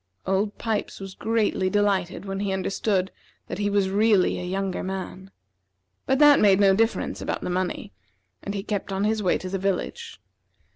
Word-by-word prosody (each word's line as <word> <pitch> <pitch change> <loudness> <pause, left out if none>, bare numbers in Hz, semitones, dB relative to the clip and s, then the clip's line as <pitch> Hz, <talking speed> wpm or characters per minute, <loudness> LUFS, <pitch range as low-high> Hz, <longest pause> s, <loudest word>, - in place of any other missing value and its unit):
Old 200 +2 0
Pipes 220 -2 -3
was 195 -1 -8
greatly 215 -3 0
delighted 195 -2 0
when 195 0 -4
he 200 -1 -1
understood 190 0 -1 0.3
that - - -6
he 205 0 +1
was 200 -2 +1
really 205 -2 +3
a - - -5
younger 190 +1 -2
man; 190 0 -6 0.8
but 265 - +3
that 295 0 +7
made 195 -2 +5
no 195 -1 +5
difference 225 +2 0
about - - -3
the - - -3
money, 185 +2 -3 0.5
and 200 - -5
he 195 - -3
kept 205 -2 -3
on 195 +1 -1
his 215 0 +1
way 185 - +2
to 185 - -7
the 195 +1 -2
village. 190 - -3
195 Hz, 180 wpm, -25 LUFS, 190-205 Hz, 0.8 s, that